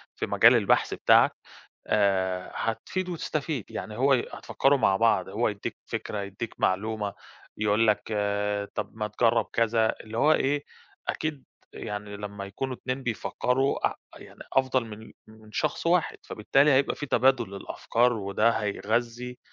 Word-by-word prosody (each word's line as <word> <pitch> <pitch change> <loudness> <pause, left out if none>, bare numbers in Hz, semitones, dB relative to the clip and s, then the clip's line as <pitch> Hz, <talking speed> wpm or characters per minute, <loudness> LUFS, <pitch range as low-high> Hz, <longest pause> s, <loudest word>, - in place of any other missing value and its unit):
في - - -2
مجال - - +6
البحث - - +2
بتاعك - - +5 0.6
آآ 95 -3 +1
هتفيد 180 +11 -3
وتستفيد، 155 - -3
يعني 105 - -6
هو 135 +3 +4
ي 125 - +2
هتفكّروا 140 +1 +1
مع 95 -7 +3
بعض، 115 +2 +2
هو - - 0
يدّيك - - -5
فكرة، 105 - -4
يدّيك 100 +3 -6
معلومة، 105 +1 0 0.4
يقول 105 +1 +2
لك 105 -1 +2
آآ 105 0 -1
طَب - - -5
ما 105 -1 -2
تجرّب 115 +1 +2
كذا، 115 -1 +2
اللي 110 +1 -6
هو 155 - +5
إيه، 145 -1 +1 0.4
أكيد 155 -4 -3 0.3
يعني 105 0 -6
لمّا 100 -1 -6
يكونوا 130 +6 -4
اتنين 130 +2 -4
بيفكّروا 125 +3 0
أ - - -8 0.2
يعني - - -14
أفضل 130 -2 +2
من 110 0 -10
من 110 0 -17
شخص 155 +5 -1
واحد، 170 -1 +2
فبالتالي 135 +7 +2
هيبقى 135 0 +3
فيه 145 - -5
تبادل 130 -2 +3
للأفكار 115 +4 0
وده 105 +1 +1
هيغذي 115 +3 -2
115 Hz, 145 wpm, -27 LUFS, 105-130 Hz, 0.6 s, مجال